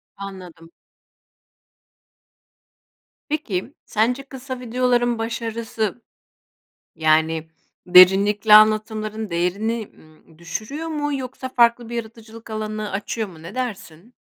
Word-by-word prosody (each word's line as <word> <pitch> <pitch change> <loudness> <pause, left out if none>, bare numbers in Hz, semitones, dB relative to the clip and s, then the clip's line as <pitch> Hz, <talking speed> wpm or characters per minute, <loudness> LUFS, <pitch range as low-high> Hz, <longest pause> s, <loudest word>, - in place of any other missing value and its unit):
Anladım. 180 -4 -10 2.6
Peki, 280 - -3
sence 245 +5 0
kısa 265 -1 -8
videoların 245 -1 +1
başarısı, 225 -1 -3 0.9
yani, 160 0 +1 0.4
derinlikle 195 +4 +7
anlatımların 215 0 +3
değerini, 200 +6 -1
ımm, 155 0 -21
düşürüyor 215 - -5
mu, 295 -2 -2
yoksa 260 0 -6
farklı 235 -1 +3
bir 240 - -6
yaratıcılık 225 0 -9
alanı 215 -1 -4
açıyor 205 +2 -3
mu, 160 -4 -14
ne 170 +5 -9
dersin? 210 -4 -6
215 Hz, 95 wpm, -22 LUFS, 190-240 Hz, 2.6 s, derinlikle